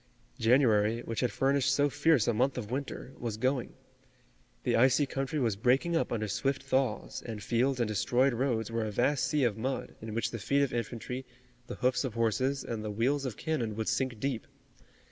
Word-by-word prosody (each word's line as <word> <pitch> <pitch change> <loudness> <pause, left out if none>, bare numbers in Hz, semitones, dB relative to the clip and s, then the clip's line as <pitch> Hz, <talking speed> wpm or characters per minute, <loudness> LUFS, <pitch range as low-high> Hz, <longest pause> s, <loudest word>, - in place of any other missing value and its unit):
January, 115 -2 +3
which 115 -2 -4
had 125 - +1
furnished 140 0 +2
so 145 +1 +3
fierce 145 -3 +3
a 120 - +3
month 130 +5 +1
of 110 -3 -5
winter, 135 0 -4
was 115 -3 -3
going. 130 +2 0 0.9
The - - +1
icy 130 +4 +4
country 135 +2 -3
was 115 -6 +1
breaking 130 - +2
up 165 - 0
under 110 -2 -1
swift 130 +6 -1
thaws, 130 0 -1
and 110 -3 -6
fields 125 +4 +1
and 120 - +1
destroyed 120 +5 +2
roads 115 -3 -1
were 115 0 -1
a - - -2
vast 125 +6 +1
sea 150 -3 +1
of 110 -3 +1
mud 130 +3 -3
in 110 0 -6
which 115 - -1
the 115 - -5
feet 140 +7 +2
of 140 - -1
infantry, 120 +2 -4 0.4
the - - -5
hoofs 125 0 +1
of 130 -5 -4
horses 130 +4 +1
and 110 -2 -4
the 110 - -3
wheels 130 +7 0
of 125 -5 -4
cannon 125 -10 -2
would 110 0 -3
sink 130 -4 -1
deep. 130 -2 -2
125 Hz, 200 wpm, -30 LUFS, 115-135 Hz, 0.9 s, icy